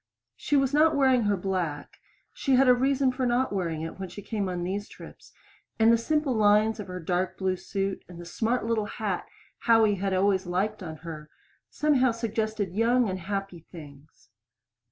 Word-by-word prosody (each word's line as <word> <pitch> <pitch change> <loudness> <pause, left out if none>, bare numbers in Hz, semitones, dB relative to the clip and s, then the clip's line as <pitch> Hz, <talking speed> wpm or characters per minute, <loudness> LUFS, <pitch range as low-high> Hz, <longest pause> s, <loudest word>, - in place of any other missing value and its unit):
She 290 - -1
was 270 0 +1
not 310 +2 +4
wearing 260 -4 +3
her 205 -1 +1
black; 180 -6 -3 0.4
she 270 - +1
had 265 +1 +4
a 250 - +8
reason 265 +1 +2
for 255 0 -1
not 245 -1 +1
wearing 165 -5 -2
it 165 - -7
when 190 -1 -5
she 205 +3 -10
came 205 -3 -2
on 175 -1 -3
these 200 +3 -4
trips, - - -13 0.5
and 225 +1 +5
the - - +6
simple 300 +2 0
lines 215 0 +3
of 205 - -6
her 180 0 -6
dark 180 +2 -2
blue 190 -1 0
suit 195 +1 -3
and 175 -1 -11
the 175 - -9
smart 225 +7 -1
little 225 -2 0
hat 210 -5 -3 0.3
Howie 225 -3 +4
had 195 -1 0
always 190 -1 +1
liked 200 +4 -1
on 160 -4 -6
her, 155 -2 -8 0.4
somehow 280 -4 +2
suggested 220 -4 -2
young 235 +3 +2
and 185 0 -3
happy 195 -1 -4
things. 145 -6 -14
205 Hz, 185 wpm, -27 LUFS, 185-240 Hz, 0.5 s, a